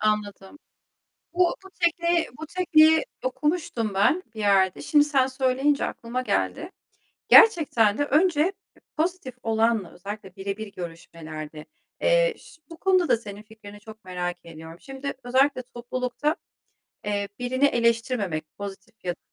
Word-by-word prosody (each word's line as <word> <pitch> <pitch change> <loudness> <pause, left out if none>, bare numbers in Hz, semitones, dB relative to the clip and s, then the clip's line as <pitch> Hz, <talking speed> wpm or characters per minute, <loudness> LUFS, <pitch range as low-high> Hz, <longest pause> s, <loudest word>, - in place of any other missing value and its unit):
Anladım. 210 +3 -2 0.8
Bu 355 -1 +2
bu - - -11
tekniği, 340 0 +2
bu - - -4
tekniği 320 0 +4 0.2
okumuştum 260 - -1
ben 300 - +2
bir - - -8
yerde. 195 -3 +3
Şimdi 295 -1 +4
sen 270 -3 +2
söyleyince 265 +2 +1
aklıma 240 +2 -4
geldi. - - -2 0.6
Gerçekten 285 - +6
de 290 - +2
önce 320 +3 +2 0.4
pozitif 320 -6 -2
olanla, 225 -3 +1
özellikle 195 +1 -9
birebir 200 +2 -5
görüşmelerde, 160 -3 -8 0.4
eee, - - +3
iş - - -17
bu 330 - -9
konuda 370 -2 +2
da - - +4
senin 210 -2 -10
fikrini 210 -2 -13
çok 220 0 -13
merak 180 -1 -3
ediyorum. 160 0 -11
Şimdi 270 +1 -6
özellikle 260 +1 +2
toplulukta, 250 +5 -3 0.7
eee, 205 -1 -1
birini 260 +3 +1
eleştirmemek, 230 - +1
pozitif 200 +2 -8
ya 175 - 0
da - - -25
240 Hz, 130 wpm, -25 LUFS, 200-295 Hz, 0.8 s, Gerçekten